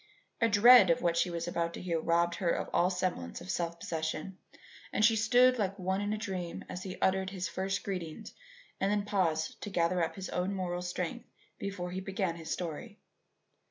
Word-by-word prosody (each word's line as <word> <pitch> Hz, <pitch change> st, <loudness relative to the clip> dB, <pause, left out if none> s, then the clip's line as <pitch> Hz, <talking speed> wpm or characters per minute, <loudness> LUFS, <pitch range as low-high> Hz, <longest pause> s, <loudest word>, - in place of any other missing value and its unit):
A 230 Hz, -, +4 dB
dread 215 Hz, -1 st, +8 dB
of 170 Hz, -, +2 dB
what 170 Hz, -1 st, +2 dB
she 170 Hz, +2 st, +2 dB
was 170 Hz, -1 st, -3 dB
about 170 Hz, -1 st, -1 dB
to -, -, -7 dB
hear 170 Hz, -3 st, 0 dB
robbed 170 Hz, +1 st, +1 dB
her 185 Hz, -4 st, 0 dB
of -, -, -1 dB
all 180 Hz, -, +3 dB
semblance 180 Hz, -, -2 dB
of 90 Hz, +1 st, -5 dB
self 170 Hz, -1 st, -2 dB
possession, 160 Hz, +3 st, -4 dB, 0.5 s
and 215 Hz, -, +3 dB
she 225 Hz, 0 st, +5 dB
stood 245 Hz, +3 st, +4 dB
like 195 Hz, -1 st, -1 dB
one 190 Hz, +1 st, -1 dB
in 205 Hz, 0 st, -1 dB
a 215 Hz, -, -1 dB
dream 185 Hz, -6 st, -5 dB
as 180 Hz, -, -6 dB
he 185 Hz, -1 st, -7 dB
uttered 190 Hz, 0 st, +2 dB
his 185 Hz, -2 st, -3 dB
first 190 Hz, +2 st, -2 dB
greetings 175 Hz, -5 st, -5 dB, 0.5 s
and 195 Hz, +1 st, +1 dB
then 205 Hz, -1 st, 0 dB
paused 170 Hz, -6 st, 0 dB
to -, -, -5 dB
gather 175 Hz, -1 st, +1 dB
up 165 Hz, -, -2 dB
his 190 Hz, -2 st, -6 dB
own 185 Hz, +2 st, -1 dB
moral 180 Hz, -2 st, -2 dB
strength 180 Hz, +6 st, -4 dB, 0.3 s
before 190 Hz, -3 st, -4 dB
he 185 Hz, +1 st, -4 dB
began 190 Hz, -2 st, -2 dB
his 165 Hz, -1 st, -9 dB
story. 180 Hz, +7 st, -4 dB
185 Hz, 200 wpm, -31 LUFS, 170-200 Hz, 0.5 s, dread